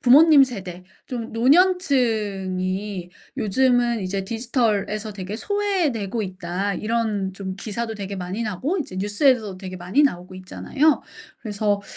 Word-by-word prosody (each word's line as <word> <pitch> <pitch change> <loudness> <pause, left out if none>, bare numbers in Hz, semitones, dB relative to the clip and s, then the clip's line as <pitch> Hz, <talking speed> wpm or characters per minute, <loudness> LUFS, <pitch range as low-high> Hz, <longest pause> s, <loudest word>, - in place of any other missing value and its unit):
'부모님 285 +3 +7
세대 190 -8 -4 0.2
좀 235 -3 -5
노년층이 210 - +1 0.3
요즘은 240 +1 +2
이제 195 0 -2
디지털에서 220 -2 -1
되게 195 +1 -5
소외되고 310 - -1
있다.' 185 +1 -3
이런 215 -4 -1
좀 190 -1 -5
기사도 225 +2 -4
되게 200 -1 -5
많이 185 +5 -4
나오고 255 - -2
이제 220 - -5
뉴스에서도 205 0 +2
되게 185 -1 -7
많이 180 +11 +1
나오고 185 -8 0
있잖아요. 280 +11 +1 0.4
그래서 205 -2 0
210 Hz, 310 characters per minute, -23 LUFS, 190-250 Hz, 0.4 s, 부모님